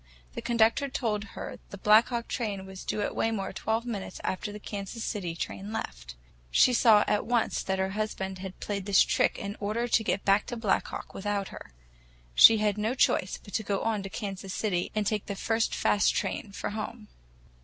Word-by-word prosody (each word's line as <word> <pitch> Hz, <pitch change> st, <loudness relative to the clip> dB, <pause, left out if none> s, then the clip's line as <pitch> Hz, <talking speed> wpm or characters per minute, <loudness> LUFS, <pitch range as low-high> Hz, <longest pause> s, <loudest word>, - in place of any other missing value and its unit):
The -, -, -5 dB
conductor 235 Hz, +4 st, +2 dB
told 220 Hz, -6 st, -1 dB
her -, -, -6 dB
the 200 Hz, -, -8 dB
Black 210 Hz, +3 st, +6 dB
Hawk 235 Hz, -2 st, -3 dB
train 205 Hz, -5 st, -3 dB
was 190 Hz, -1 st, -9 dB
due 210 Hz, -, -2 dB
at -, -, -1 dB
Waymore 220 Hz, -4 st, -1 dB
twelve 225 Hz, +2 st, -1 dB
minutes 205 Hz, -6 st, -5 dB
after 190 Hz, +2 st, -2 dB
the 210 Hz, -, -8 dB
Kansas 205 Hz, +2 st, -6 dB
City 180 Hz, -6 st, -3 dB
train 195 Hz, +4 st, -5 dB
left. -, -, -6 dB, 0.3 s
She 250 Hz, -, +5 dB
saw 220 Hz, -3 st, +6 dB
at 210 Hz, 0 st, +1 dB
once 240 Hz, -1 st, +1 dB
that 190 Hz, 0 st, -1 dB
her 190 Hz, 0 st, 0 dB
husband 190 Hz, -2 st, -3 dB
had 190 Hz, 0 st, -8 dB
played 200 Hz, -1 st, -4 dB
this 200 Hz, -1 st, +6 dB
trick -, -, +1 dB
in 200 Hz, +1 st, -5 dB
order 215 Hz, +4 st, -1 dB
to 225 Hz, -1 st, +3 dB
get 200 Hz, -2 st, -1 dB
back 200 Hz, +1 st, +3 dB
to 240 Hz, -, -4 dB
Black 225 Hz, -4 st, +1 dB
Hawk -, -, -7 dB
without 200 Hz, 0 st, -2 dB
her. -, -, -11 dB, 0.6 s
She 225 Hz, -, +9 dB
had 210 Hz, -1 st, +1 dB
no 220 Hz, +4 st, 0 dB
choice 185 Hz, -7 st, +2 dB
but 200 Hz, -, -13 dB
to -, -, +1 dB
go 200 Hz, -2 st, -2 dB
on 220 Hz, -2 st, 0 dB
to 195 Hz, -, -6 dB
Kansas 195 Hz, -2 st, -5 dB
City 185 Hz, -3 st, -1 dB
and 215 Hz, -1 st, +1 dB
take 210 Hz, 0 st, -1 dB
the 200 Hz, -, -3 dB
first 225 Hz, +3 st, 0 dB
fast 205 Hz, -, +2 dB
train 205 Hz, -, -2 dB
for 200 Hz, -, -4 dB
home. 215 Hz, +1 st, -6 dB
210 Hz, 205 wpm, -28 LUFS, 195-225 Hz, 0.6 s, She